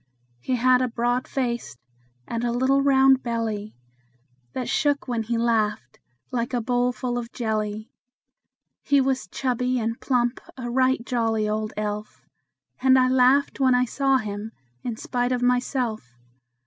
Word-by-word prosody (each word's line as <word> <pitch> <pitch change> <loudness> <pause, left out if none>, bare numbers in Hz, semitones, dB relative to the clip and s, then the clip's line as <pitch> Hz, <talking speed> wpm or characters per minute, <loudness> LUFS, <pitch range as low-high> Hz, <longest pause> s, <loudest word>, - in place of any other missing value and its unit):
He 250 - -1
had 250 +1 +4
a 255 - +1
broad 245 +1 -1
face, 240 - -3 0.5
and 230 0 -3
a 240 - 0
little 260 +3 +2
round 270 -1 +5
belly 225 -3 -3 0.8
That 250 - -3
shook 290 -2 +1
when 240 -2 -1
he 230 +1 -2
laughed, 215 - 0 0.3
like 240 0 -2
a - - +1
bowl 245 +1 +1
full 245 -1 -3
of 235 0 -7
jelly. 215 -2 -3 0.9
He 285 -1 +3
was 265 -5 0
chubby 250 +3 -1
and 230 +1 -3
plump 245 -2 0 0.2
a 240 -2 -5
right 255 -1 +2
jolly 225 -4 0
old 215 0 -2
elf; 210 0 -5 0.6
And 260 0 +5
I 255 0 +4
laughed 260 +3 +3
when 260 -2 +4
I 250 0 +3
saw 270 +2 +2
him 215 -1 -5 0.3
in 235 - -4
spite 245 +2 -1
of 250 -1 0
myself. 245 - -1
245 Hz, 150 wpm, -24 LUFS, 225-255 Hz, 0.9 s, round